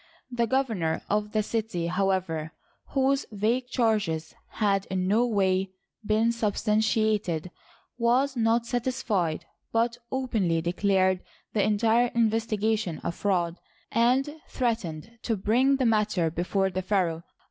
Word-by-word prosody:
The 235 Hz, -1 st, 0 dB
governor 220 Hz, -11 st, 0 dB
of 210 Hz, 0 st, 0 dB
the 215 Hz, 0 st, +1 dB
city, 215 Hz, -6 st, -2 dB
however, 180 Hz, -3 st, -1 dB, 0.3 s
whose 270 Hz, 0 st, +1 dB
vague 225 Hz, +5 st, 0 dB
charges 210 Hz, -11 st, 0 dB, 0.2 s
had 200 Hz, -2 st, +1 dB
in 185 Hz, -1 st, -1 dB
no 225 Hz, +5 st, +3 dB
way 190 Hz, -3 st, +1 dB, 0.3 s
been 220 Hz, +2 st, +2 dB
sub 220 Hz, -3 st, -1 dB
stantiated, 215 Hz, -5 st, +1 dB, 0.5 s
was 255 Hz, +4 st, +2 dB
not 230 Hz, 0 st, +2 dB
satisfied, 235 Hz, -9 st, -1 dB, 0.3 s
but 235 Hz, +1 st, +1 dB
openly 220 Hz, -11 st, 0 dB
declared 185 Hz, +2 st, +1 dB, 0.3 s
the 215 Hz, -, +2 dB
en 210 Hz, +1 st, +2 dB
tire 230 Hz, +2 st, +3 dB
investigation 220 Hz, -5 st, 0 dB
a -, -, -1 dB
fraud, 175 Hz, -2 st, -1 dB, 0.3 s
and 265 Hz, +6 st, +2 dB
threatened 225 Hz, -, -3 dB
to 225 Hz, -3 st, -1 dB
bring 245 Hz, +8 st, +3 dB
the 265 Hz, -1 st, 0 dB
matter 210 Hz, -7 st, +2 dB
before 190 Hz, +3 st, 0 dB
the 185 Hz, +1 st, -2 dB
pharaoh. 180 Hz, -4 st, 0 dB
215 Hz, 125 wpm, -27 LUFS, 185-235 Hz, 0.5 s, no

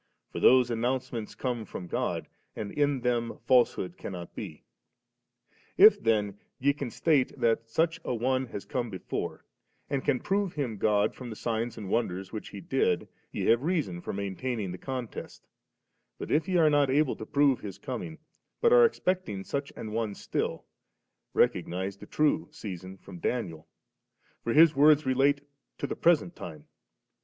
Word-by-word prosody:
For -, -, -4 dB
those 125 Hz, -2 st, +6 dB
announcements 120 Hz, -1 st, -2 dB
come 125 Hz, -3 st, -2 dB
from 95 Hz, -3 st, -7 dB
God, -, -, -2 dB, 0.3 s
and 105 Hz, -2 st, -5 dB
in 145 Hz, -3 st, +1 dB
them 120 Hz, -1 st, 0 dB
falsehood 120 Hz, -7 st, +3 dB
cannot 90 Hz, -3 st, -6 dB
he. -, -, -7 dB, 1.1 s
If -, -, +8 dB
then 105 Hz, -3 st, +1 dB, 0.2 s
ye 140 Hz, +2 st, +2 dB
can 140 Hz, -3 st, -5 dB
state 140 Hz, 0 st, +1 dB
that 115 Hz, -1 st, +1 dB
such 160 Hz, +7 st, +1 dB
a -, -, -3 dB
one 130 Hz, +2 st, 0 dB
has 100 Hz, -, -7 dB
come 120 Hz, -2 st, -2 dB
before^ 95 Hz, -, -4 dB, 0.5 s
and 140 Hz, -2 st, 0 dB
can 135 Hz, -3 st, +1 dB
prove 195 Hz, -2 st, 0 dB
him 125 Hz, -8 st, -3 dB
God 105 Hz, +1 st, +2 dB
from 125 Hz, -2 st, -8 dB
the 110 Hz, -, -6 dB
signs 115 Hz, +1 st, -2 dB
and 105 Hz, -3 st, -6 dB
wonders 95 Hz, -3 st, -1 dB
which 110 Hz, -, -6 dB
he 100 Hz, -, -8 dB
did, -, -, 0 dB, 0.2 s
ye -, -, -3 dB
have 115 Hz, +1 st, +4 dB
reason 145 Hz, -, -1 dB
for -, -, -5 dB
maintaining 100 Hz, +1 st, -3 dB
the 90 Hz, -, -7 dB
contest, 130 Hz, -4 st, -6 dB, 0.7 s
but -, -, -6 dB
if 155 Hz, +4 st, +2 dB
ye 185 Hz, -, +2 dB
are 155 Hz, -3 st, +5 dB
not 145 Hz, -2 st, +3 dB
able 145 Hz, +1 st, +2 dB
to 110 Hz, -, -7 dB
prove 140 Hz, -3 st, +3 dB
'His 100 Hz, -3 st, -7 dB
coming, 135 Hz, +5 st, -6 dB, 0.4 s
but 470 Hz, 0 st, +4 dB
are -, -, +8 dB
expecting 185 Hz, -, -1 dB
such 140 Hz, +5 st, -3 dB
an 110 Hz, -, -6 dB
one 110 Hz, -2 st, -2 dB
still, -, -, -3 dB, 0.7 s
recognise 95 Hz, +2 st, +1 dB
the -, -, -12 dB
true 155 Hz, +1 st, +1 dB
season 95 Hz, -, -8 dB
from 90 Hz, -3 st, -12 dB
Danid, 85 Hz, -10 st, -2 dB, 0.8 s
t<x 115 Hz, -, +1 dB
his 160 Hz, -1 st, +7 dB
words 150 Hz, +1 st, +6 dB
rdate 140 Hz, +2 st, +2 dB, 0.4 s
to -, -, -3 dB
the -, -, -3 dB
present 170 Hz, 0 st, +2 dB
time. 75 Hz, -3 st, -9 dB
120 Hz, 165 wpm, -29 LUFS, 105-145 Hz, 1.1 s, If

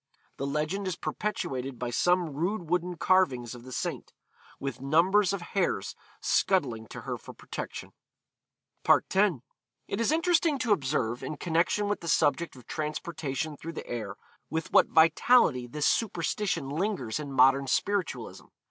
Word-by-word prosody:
The 140 Hz, -, -3 dB
legend 155 Hz, +7 st, -2 dB
is 185 Hz, -, -1 dB
perpetuated 135 Hz, -, -3 dB
by 120 Hz, -1 st, -3 dB
some 175 Hz, +3 st, +2 dB
rude 175 Hz, +3 st, -2 dB
wooden 180 Hz, 0 st, 0 dB
carvings 135 Hz, -13 st, +2 dB
of 120 Hz, -, -10 dB
the 130 Hz, +2 st, -11 dB
saint, -, -, -4 dB, 0.5 s
with 135 Hz, -2 st, -5 dB
numbers 180 Hz, +8 st, +3 dB
of 200 Hz, -3 st, -3 dB
hares 180 Hz, -, 0 dB, 0.3 s
scuttling 125 Hz, -, +1 dB
to -, -, -8 dB
her -, -, -4 dB
for -, -, -11 dB
protection.' -, -, -7 dB, 0.9 s
X. -, -, +5 dB, 0.8 s
It 200 Hz, -, -2 dB
is 230 Hz, -, +2 dB
interesting 330 Hz, -2 st, +2 dB
to 235 Hz, -5 st, +2 dB
observe, 130 Hz, -, -1 dB
in 155 Hz, -, -5 dB
connection 175 Hz, +5 st, +1 dB
with 205 Hz, -, -1 dB
the 170 Hz, -, -7 dB
subject 160 Hz, +1 st, +2 dB
of 125 Hz, -3 st, -14 dB
transportation 155 Hz, -1 st, -3 dB
through 165 Hz, +3 st, -7 dB
the -, -, -7 dB
air, 105 Hz, -4 st, -5 dB, 0.3 s
with 160 Hz, +1 st, -3 dB
what -, -, +6 dB
vitality 160 Hz, -, +4 dB
this 150 Hz, +4 st, -2 dB
superstition 190 Hz, -5 st, 0 dB
lingers 155 Hz, -, -2 dB
in 145 Hz, -2 st, -6 dB
modern 135 Hz, +1 st, +4 dB
spiritualism. 200 Hz, +7 st, -1 dB
160 Hz, 150 wpm, -28 LUFS, 135-190 Hz, 0.9 s, what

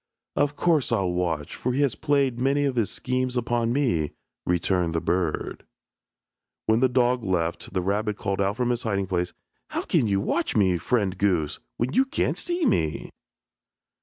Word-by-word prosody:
"Of 145 Hz, 0 st, +1 dB
course 155 Hz, -3 st, +2 dB
I'll 100 Hz, -6 st, +1 dB
watch, 85 Hz, -4 st, -2 dB
for 125 Hz, -, -2 dB
he 140 Hz, -, +1 dB
has 140 Hz, -5 st, +2 dB
played 140 Hz, -5 st, +1 dB
many 140 Hz, +3 st, +2 dB
of 135 Hz, -2 st, 0 dB
his 115 Hz, -4 st, +1 dB
schemes 130 Hz, 0 st, -2 dB
upon 120 Hz, -1 st, 0 dB
me," 115 Hz, -, +1 dB, 0.3 s
returned 90 Hz, -1 st, +1 dB
the -, -, +2 dB
bird. 85 Hz, -1 st, -1 dB, 1.0 s
When 110 Hz, +1 st, +3 dB
the 130 Hz, +1 st, +4 dB
dog 125 Hz, -1 st, +2 dB
left, 85 Hz, -4 st, -1 dB
the 90 Hz, -, +1 dB
rabbit 105 Hz, +2 st, 0 dB
called 100 Hz, +1 st, -1 dB
out 100 Hz, +2 st, 0 dB
from 125 Hz, -1 st, +1 dB
his 120 Hz, -1 st, -1 dB
hiding 100 Hz, -3 st, 0 dB
place, 90 Hz, -1 st, -1 dB, 0.4 s
"How -, -, -3 dB
can 115 Hz, -, +2 dB
you 100 Hz, -1 st, +2 dB
watch, 100 Hz, -, 0 dB, 0.3 s
friend 100 Hz, -1 st, 0 dB
goose, 90 Hz, -7 st, +1 dB, 0.2 s
when 125 Hz, +4 st, -1 dB
you 265 Hz, -, +4 dB
can't 265 Hz, -, 0 dB
see 350 Hz, -2 st, -1 dB
me?" 80 Hz, -, 0 dB
110 Hz, 170 wpm, -25 LUFS, 90-130 Hz, 1.0 s, the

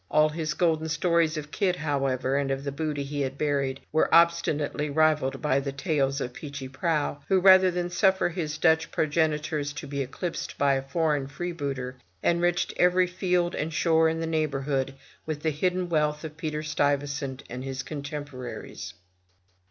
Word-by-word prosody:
All 155 Hz, 0 st, +4 dB
his 155 Hz, 0 st, -3 dB
golden 160 Hz, -2 st, +1 dB
stories 165 Hz, 0 st, +2 dB
of 150 Hz, 0 st, -6 dB
Kidd, 185 Hz, -3 st, +1 dB
however, 135 Hz, -4 st, 0 dB
and 140 Hz, -1 st, 0 dB
of 135 Hz, 0 st, -2 dB
the 140 Hz, -, -3 dB
booty 145 Hz, 0 st, -2 dB
he 145 Hz, +1 st, -3 dB
had 135 Hz, 0 st, -2 dB
buried, 140 Hz, -3 st, 0 dB
were 155 Hz, -, +2 dB
obstinately 155 Hz, -3 st, +3 dB
rivalled 155 Hz, -2 st, +2 dB
by 140 Hz, -2 st, +3 dB
the 140 Hz, 0 st, -3 dB
tales 140 Hz, -2 st, 0 dB
of 125 Hz, -2 st, -4 dB
Peechy 140 Hz, 0 st, -7 dB
Prauw, 145 Hz, +1 st, -1 dB
who 190 Hz, -, +4 dB
rather 190 Hz, 0 st, +7 dB
than 175 Hz, 0 st, -2 dB
suffer 190 Hz, 0 st, +3 dB
his 160 Hz, -3 st, -3 dB
Dutch 160 Hz, -1 st, +3 dB
progenitors 150 Hz, -1 st, 0 dB
to 150 Hz, -, -7 dB
be 140 Hz, 0 st, -3 dB
eclipsed 165 Hz, +6 st, -4 dB
by 140 Hz, -1 st, +3 dB
a 135 Hz, -, 0 dB
foreign 145 Hz, 0 st, 0 dB
freebooter, 140 Hz, -5 st, -4 dB, 0.3 s
enriched 175 Hz, 0 st, +1 dB
every 180 Hz, +1 st, +4 dB
field 180 Hz, -1 st, 0 dB
and 155 Hz, +2 st, -2 dB
shore 160 Hz, 0 st, +3 dB
in 160 Hz, 0 st, -2 dB
the 165 Hz, -, -1 dB
neighborhood 140 Hz, -4 st, -1 dB, 0.3 s
with 155 Hz, -2 st, -4 dB
the 160 Hz, -, +2 dB
hidden 180 Hz, +4 st, 0 dB
wealth 150 Hz, -2 st, 0 dB
of 155 Hz, -1 st, -7 dB
Peter 155 Hz, -1 st, -3 dB
Stuyvesant 145 Hz, -2 st, -1 dB
and 125 Hz, +2 st, -6 dB
his 135 Hz, 0 st, -4 dB
contemporaries. 145 Hz, -3 st, -7 dB
150 Hz, 165 wpm, -27 LUFS, 140-165 Hz, 0.3 s, rather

